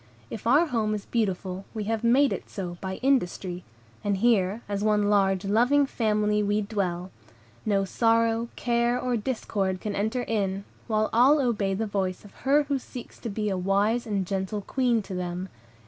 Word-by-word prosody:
If 225 - -5
our 290 +8 +5
home 220 -7 0
is 205 - -6
beautiful, 190 -4 -2
we 215 - -2
have 225 +1 -2
made 265 +4 +4
it - - -6
so 175 -4 -6
by 190 0 -3
industry; 185 -8 0 0.4
and 205 -1 +1
here, 210 -1 +2
as 200 0 -2
one 210 -1 +2
large, 195 -1 +2
loving 245 +8 +4
family, 210 -4 +1
we 205 +1 +1
dwell; 190 -4 -2 0.6
no 200 -2 +2
sorrow, 230 +2 +2
care, 240 0 +1
or 250 -1 0
discord 205 -5 -2
can 210 +1 -4
enter 220 +5 -1
in, 200 -4 -1 0.2
while 215 -1 +1
all 260 +6 +6
obey 210 -7 +1
the 220 +3 -1
voice 195 -2 -2
of 205 - -14 0.2
her 295 +2 +5
who 280 -1 -1
seeks 250 -1 -10
to 230 - -5
be 210 +1 -2
a 195 - 0
wise 205 +6 +1
and 200 -3 -1
gentle 195 +2 -2
Queen 240 0 +1
to 195 - -8
them. 180 +1 -4
210 Hz, 180 wpm, -26 LUFS, 195-235 Hz, 0.6 s, all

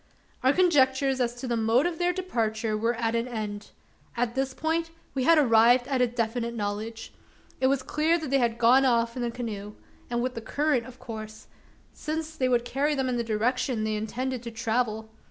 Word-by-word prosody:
Our 260 - +4
conjectures 270 -6 +3
as 240 -1 0
to 255 +2 -6
the 240 - 0
mode 230 +5 +2
of 345 -2 -2
their 355 0 +2
departure 225 - -1
were 230 +3 0
at 225 0 -1
an 235 +1 0
end. 210 -3 -5 0.5
On 240 -1 +1
this 265 +1 -1
point, 330 +1 -1 0.2
we 260 -2 -1
had 330 -1 +6
arrived 245 -2 +5
at 265 -2 0
a 250 - +4
definite 235 0 -2
knowledge. 215 +2 -4 0.5
It 260 - +3
was 270 -1 +1
clear 310 +5 +1
they 275 -4 0
had 235 -2 +1
gone 245 +3 +5
off 235 -2 +2
in 250 - -3
the 240 - 0
canoe; 210 -4 -6 0.3
and 240 0 -1
with 255 0 -2
the 230 - -6
current, 285 0 0
of 255 -1 -12
course: 220 -3 -8 0.5
since 315 +1 -4
that 255 -4 +1
would 240 -1 +2
carry 285 +4 0
them 265 -2 0
in 245 - -1
the 235 - 0
direction 230 +1 0
they 215 0 -1
intended 245 +4 -3
to 235 - -6
travel. 220 -1 -2
245 Hz, 200 wpm, -27 LUFS, 225-265 Hz, 0.5 s, had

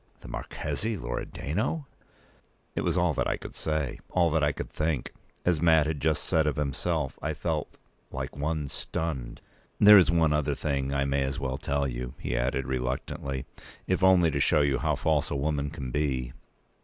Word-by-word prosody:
"The - - -11
Marchese 110 0 -3
Loredano!" 85 - -3 0.9
It - - -1
was 85 0 0
all 90 -2 +3
that - - 0
I - - 0
could - - -9
say; 75 -4 -2
all 85 -3 +2
that 80 -1 +2
I 75 - +3
could - - -6
think. 75 -4 -1 0.3
As 85 -4 +2
Mat 80 -3 +5
had 75 -1 -2
just 80 +1 +1
said 80 -1 +2
of 75 - +1
himself, 75 0 -1
I 75 0 -2
felt 75 0 -3 0.3
"like 65 +1 -5
one 75 0 -2
stunned." 70 -4 -4 0.4
"There 105 0 +10
is 90 - +4
one 80 -2 +3
other 75 -2 +1
thing 70 -2 -1
I 70 0 +1
may 70 0 +1
as 65 0 -1
well 65 -1 -2
tell 70 0 0
you," 60 0 -5
he - - -3
added, 60 +2 0
reluctantly, 65 +1 -3 0.4
"if 95 0 0
only 90 -3 +6
to 70 - -1
show 75 +2 +4
you 70 -3 +2
how 75 +1 +1
false 75 +1 +1
a - - -2
woman 70 0 -1
can 65 -5 -6
be. 65 -4 -1
75 Hz, 185 wpm, -28 LUFS, 70-80 Hz, 0.9 s, There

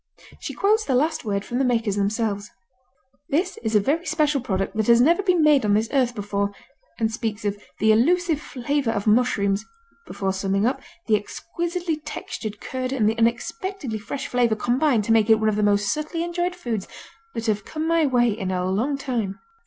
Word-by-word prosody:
She - - -6
quotes 430 +2 +2
the 265 - 0
last 310 +5 +1
word 200 -2 -1
from 245 - -2
the - - +3
makers 230 -5 +1
themselves: 205 0 -1 0.8
"This 355 +6 0
is 220 -1 -1
a - - +7
very 310 - 0
special 300 -3 +1
product 195 -5 -2
that 220 -1 0
has 235 0 +6
never 335 +10 +4
been 365 -5 +2
made 295 -4 +5
on 205 -1 +3
this 220 +1 +1
earth 250 -3 +2
before," 200 -1 -1 0.5
and 220 -1 +1
speaks 220 -2 -4
of 205 0 0 0.2
"the 220 +1 +4
elusive 320 +7 +2
flavor 280 -1 -2
of 205 -3 -1
mushrooms" 210 -3 +2 0.4
before 195 -1 -2
summing 195 +1 0
up, 255 - 0 0.2
"the 220 - +3
exquisitely 340 - -3
textured 235 -8 -6
curd 255 0 -4
and 240 -6 +1
the 220 +1 +1
unexpectedly 250 - -1
fresh 265 +6 -5
flavor 240 -3 +1
combine 245 +1 +1
to 225 - -1
make 225 -1 +4
it 220 -1 +6
one 220 0 +2
of 210 - 0
the 210 - 0
most 205 0 +2
subtly 310 +2 -3
enjoyable 350 +1 -2
foods 230 - -3 0.5
that 230 -1 -3
have 210 -2 0
come 315 +6 -4
my 330 0 +3
way 240 -3 +3
in 200 -3 -3
a 180 -1 -1
long 255 +9 0
time." 235 -8 -3
235 Hz, 195 wpm, -23 LUFS, 210-300 Hz, 0.8 s, a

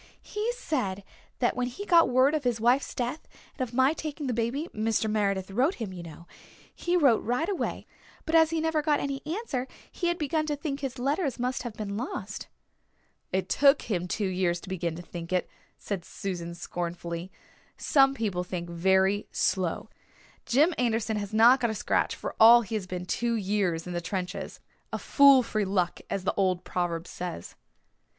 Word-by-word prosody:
"He 430 +3 -2
said 200 - -2 0.3
that 240 - +1
when 250 0 -1
he 325 +12 -7
got 335 -7 +5
word 255 +3 +4
of 305 -2 0
his 245 -3 0
wife's 245 +5 +2
death 250 +5 -3 0.3
and - - -8
of 255 -3 -2
my 265 +3 +4
taking 305 -2 -5
the 255 - -1
baby 240 +8 -1
Mr. 220 +1 0
Meredith 200 -3 0
wrote 265 - +2
him, 215 -5 -5
you 180 - -7
know 170 0 -11 0.5
he 350 +1 0
wrote 275 -9 +4
right 250 +8 0
away, 395 -2 -3 0.4
but 320 - -3
as 320 -1 +6
he 330 0 -1
never 320 -1 +1
got 295 -1 +2
any 275 -1 -3
answer 315 - -3 0.2
he 350 - -2
had 345 0 +1
begun 310 0 -1
to 295 - 0
think 285 -1 -4
his 270 -2 -4
letter 285 +5 0
must 250 +1 -1
have 235 -4 -6
been 205 -2 -4
lost." 250 +5 -5 0.8
"It 190 0 -1
took 280 +1 +4
him 180 -5 -2
two 205 +3 -1
years 180 -2 0
to - - -10
begin 175 -3 -2
to 175 - -8
think 170 0 -8
it," 180 -1 +1 0.3
said 195 -4 -4
Susan 175 -3 -5
scornfully. 175 +1 -5 0.5
"Some 270 -1 +4
people 200 -7 -1
think 175 -1 -5
very 190 +3 +2
slow. 185 -4 0 0.6
Jim 300 +8 +4
Anderson 225 -2 0
has 205 -1 -4
not 235 +4 +6
got 240 -2 +1
a 220 - -2
scratch, - - 0
for - - -5
all 235 +2 +9
he 215 - -8
has 205 -4 -2
been 180 -1 -5
two 235 +6 0
years 195 -5 0
in 180 - -5
the 175 - -2
trenches. 180 +1 -4 0.3
A - - -2
fool 280 -2 +6
for 215 -2 -1
luck, 185 -3 0
as 195 - -2
the - - 0
old 185 -2 +1
proverb 170 -2 -2
says." 175 - -6
225 Hz, 190 wpm, -28 LUFS, 185-275 Hz, 0.8 s, all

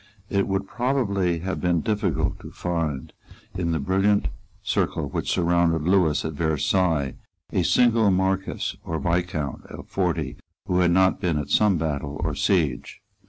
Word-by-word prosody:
It 100 -1 +1
would 95 0 -1
probably 100 -10 0
have 95 +2 -3
been 85 -2 +2
difficult 95 -8 -1
to - - -10
find 80 -6 -3 0.4
in 85 -2 -1
the 80 - +1
brilliant 95 +7 +2 0.3
circle 70 - 0
which - - -3
surrounded 85 -2 +2
Lewis 90 -4 +2
at 80 - -3
Versailles 80 -1 +1 0.4
a - - +2
single 115 -3 +4
Marquess 95 +1 0
or 80 - -3
Viscount 85 -5 -2
of - - -10
forty - - -1 0.3
who 90 - +1
had 90 -1 +4
not 95 +2 +3
been 85 -4 +1
at 75 -2 -4
some 105 -4 +4
battle 75 -2 -3
or 80 -2 0
siege. 75 -7 0
90 Hz, 150 wpm, -24 LUFS, 80-95 Hz, 0.4 s, single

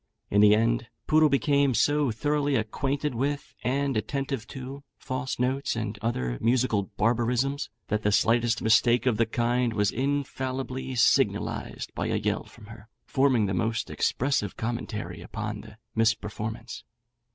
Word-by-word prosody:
In 100 - +4
the 105 0 +7
end, 115 +2 +1 0.2
Poodle 155 0 +5
became 140 -1 +2
so 145 +4 +3
thoroughly 145 +4 0
acquainted 135 +5 -1
with, 140 +4 -2
and 140 +1 0
attentive 135 +1 -2
to, 135 +1 -8 0.2
false 130 +1 -4
notes 130 +2 0
and 110 -2 -4
other 65 - -2
musical 115 -5 +1
barbarisms, 120 +5 +1 0.2
that 105 0 0
the 105 - +1
slightest 115 +2 +2
mistake 120 +2 +4
of 120 -4 +2
the 115 - +2
kind 120 +1 +1
was 105 -2 +1
infallibly 130 -1 -2
signalised 120 - +1
by - - -2
a - - 0
yell - - -1
from 110 - -15
her, 110 0 -13 0.2
forming 130 -5 +3
the 95 - -1
most 115 +4 -1
expressive 130 -7 0
commentary 115 -2 -4
upon - - -5
the 110 - -14 0.2
misperformance. 110 -1 -1
120 Hz, 140 wpm, -27 LUFS, 110-135 Hz, 0.2 s, the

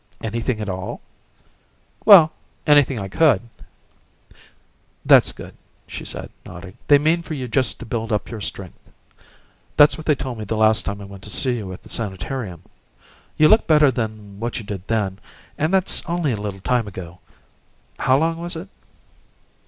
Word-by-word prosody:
"Anything 115 +1 -2
at 105 - -4
all?" 95 -1 -5 1.1
"Well 185 -7 +9 0.3
anything 145 -5 +4
I 100 - -4
could." 125 -1 +3 1.6
"That's - - +6
good," - - -11 0.3
she - - -8
said, - - -4
nodding. 90 +2 -11
"They 145 - +7
mean 160 +4 +1
for 160 -2 -6
you 130 -3 -5
just 120 +1 0
to - - -8
build 115 0 -4
up 105 - -1
your 110 -3 -6
strength. 95 -2 -6 1.0
That's 145 0 +6
what 155 - -10
they 150 - +4
told 125 -3 -6
me - - -4
the 110 +2 -3
last 110 0 +3
time 100 0 -4
I - - -8
went 100 -1 -12
to - - -9
see 125 +2 +1
you 100 -4 -6
at 90 - -10
the - - -15
sanitarium. 95 -2 -4 0.7
You 155 - +6
look 220 +6 +4
better 150 -3 +5
than 110 -4 -5
what 120 +1 -3
you 115 - -6
did 100 -2 -7
then, 100 -4 -1 0.4
and 155 +3 -1
that's 190 -1 +1
only 170 -4 0
a - - 0
little 100 -2 -5
time 120 0 0
ago. 90 -2 -9 0.8
How 130 - +3
long 165 +2 0
was 175 0 -4
it?" 170 +4 -8
115 Hz, 175 wpm, -21 LUFS, 100-150 Hz, 1.6 s, Well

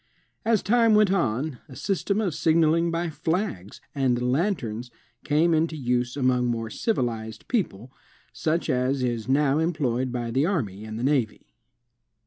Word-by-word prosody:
As 225 -2 +2
time 230 0 +4
went 210 -2 +4
on, 140 - 0
a 130 - -11
system 200 +4 -1
of 190 -7 -1
signaling 165 +1 +3
by 165 0 -2
flags 160 - -3
and 130 -4 +1
lanterns 125 - -1 0.3
came 160 +3 +2
into 160 0 +1
use 125 -1 -1
among 125 -2 +2
more 115 -2 -2
civilized 115 - -2
people, 130 - -2 0.4
such 165 +2 -1
as 130 -1 0
is 120 -1 -2
now 140 +1 +3
employed 130 -7 0
by 120 -1 -3
the 130 +4 +2
army 110 - -2
and 110 0 -6
the 115 - -4
navy. 130 -6 -1
140 Hz, 145 wpm, -25 LUFS, 120-170 Hz, 0.4 s, time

